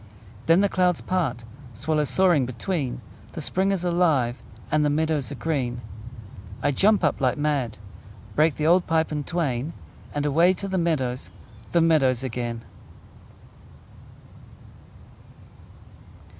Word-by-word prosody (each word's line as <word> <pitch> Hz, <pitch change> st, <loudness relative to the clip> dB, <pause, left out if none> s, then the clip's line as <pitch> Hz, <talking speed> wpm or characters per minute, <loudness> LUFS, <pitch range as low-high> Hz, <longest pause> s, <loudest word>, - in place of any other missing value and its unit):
Then 165 Hz, +3 st, +5 dB
the 200 Hz, -, +4 dB
clouds 180 Hz, -3 st, +1 dB
part, 140 Hz, -11 st, -2 dB, 0.3 s
Swallows 150 Hz, +4 st, 0 dB
soaring 175 Hz, -9 st, +3 dB
between; 135 Hz, +2 st, -3 dB, 0.3 s
The -, -, -6 dB
spring 190 Hz, +2 st, 0 dB
is 190 Hz, -3 st, -1 dB
alive, 160 Hz, -9 st, +1 dB, 0.3 s
And 150 Hz, 0 st, +3 dB
the 150 Hz, -, +2 dB
meadows 150 Hz, -4 st, 0 dB
are -, -, -4 dB
green! 130 Hz, -7 st, -2 dB, 0.8 s
I 145 Hz, -, +3 dB
jump 200 Hz, +7 st, +3 dB
up 150 Hz, -3 st, +1 dB
like 130 Hz, -2 st, +2 dB
mad, 145 Hz, -6 st, -1 dB, 0.6 s
Break 155 Hz, 0 st, +3 dB
the 150 Hz, -, -2 dB
old 175 Hz, +2 st, +4 dB
pipe 160 Hz, -1 st, +1 dB
in 150 Hz, -1 st, -2 dB
twain, 150 Hz, -3 st, -2 dB, 0.4 s
And 145 Hz, 0 st, -2 dB
away 165 Hz, +6 st, +4 dB
to 195 Hz, +2 st, -5 dB
the 190 Hz, -1 st, -1 dB
meadows, 135 Hz, -7 st, -1 dB, 0.4 s
The 170 Hz, -, +3 dB
meadows 135 Hz, -7 st, +3 dB
again! 120 Hz, -2 st, -4 dB
155 Hz, 130 wpm, -24 LUFS, 130-175 Hz, 0.8 s, Then